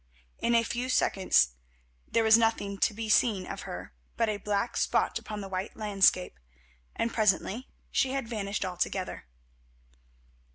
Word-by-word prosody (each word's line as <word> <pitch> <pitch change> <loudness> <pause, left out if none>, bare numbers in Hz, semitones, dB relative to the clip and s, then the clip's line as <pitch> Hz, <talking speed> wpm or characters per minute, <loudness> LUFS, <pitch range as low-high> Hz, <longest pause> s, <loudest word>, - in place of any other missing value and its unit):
In 235 - +2
a 230 - +4
few 240 +2 -3
seconds 185 - +3 0.6
there 230 - +2
was 220 0 +7
nothing 225 -3 +1
to - - +3
be 220 +1 -5
seen 215 -3 +3
of - - -6
her - - -7 0.2
but 230 -1 +2
a 210 - -1
black 210 +4 -2
spot - - +1
upon 210 -1 -6
the 195 - -6
white 190 0 -4
landscape, 195 - +2 0.6
and 230 0 -1
presently 215 +3 +1 0.2
she 265 - +2
had 270 -3 -2
vanished 210 -3 -3
altogether. 180 - -3
210 Hz, 150 wpm, -29 LUFS, 195-230 Hz, 0.6 s, was